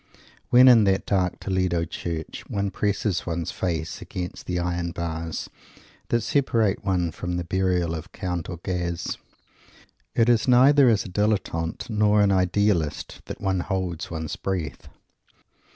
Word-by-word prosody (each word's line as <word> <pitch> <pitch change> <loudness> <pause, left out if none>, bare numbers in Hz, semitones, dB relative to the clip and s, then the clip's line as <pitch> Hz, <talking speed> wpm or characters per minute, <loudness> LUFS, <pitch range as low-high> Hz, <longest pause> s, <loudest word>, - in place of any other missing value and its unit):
When, 125 +1 +7
in 115 -4 +7
that 95 -1 +1
dark 90 -3 0
Toledo 90 -3 0
Church, 80 -1 -5
one 100 -1 -1
presses 100 -1 -1
one's 85 0 -2
face 80 -3 -3
against 90 -1 -6
the 90 - -1
iron 85 -1 -2
bars 80 -1 -4 0.6
that 120 - +2
separate 115 -5 +1
one 90 -4 0
from 90 +1 -4
the 90 - -2
Burial 90 -1 0
of 80 +2 -7
Count 90 -3 -4
Orguz, 85 -2 -3 1.0
it 115 - +4
is 120 0 +3
neither 130 +2 +6
as 110 -3 +2
a - - -6
Dilettante 95 -2 -1
nor 105 -1 +3
an 100 -1 +4
Idealist 90 -4 0
that - - -7
one 95 -1 0
holds 90 -2 -3
one's 80 -2 -4
breath. 90 -7 -4
90 Hz, 140 wpm, -25 LUFS, 85-105 Hz, 1.0 s, When